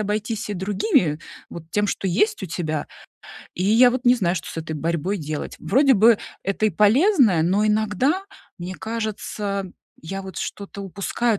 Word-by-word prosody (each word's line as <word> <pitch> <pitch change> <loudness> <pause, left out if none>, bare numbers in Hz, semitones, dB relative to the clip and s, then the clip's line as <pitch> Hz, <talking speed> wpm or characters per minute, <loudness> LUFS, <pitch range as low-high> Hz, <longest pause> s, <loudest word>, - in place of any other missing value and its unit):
обойтись 215 +1 -2
и 205 - -2
другими, 190 -5 +1 0.3
вот 165 -1 -10
тем, 210 0 +1
что 195 - -2
есть 420 - +1
у - - -3
тебя. 155 -3 -3 0.7
И 180 - -2
я 235 +4 +6
вот 255 +1 -3
не 245 +1 +6
знаю, 185 -6 0
что 170 - -5
с - - -8
этой 160 -1 -4
борьбой 170 +5 -1
делать. 150 -1 -5
Вроде 270 0 +3
бы 220 +1 +5 0.3
это 195 +3 0
и - - +2
полезное, 220 - +4
но 200 +5 +2
иногда, 220 - +1 0.4
мне 180 +2 -6
кажется, 210 -3 -4 0.3
я 195 +5 -6
вот 190 0 -9
что-то 200 0 -6
упускаю, 200 +3 -1
205 Hz, 170 wpm, -22 LUFS, 180-220 Hz, 0.7 s, я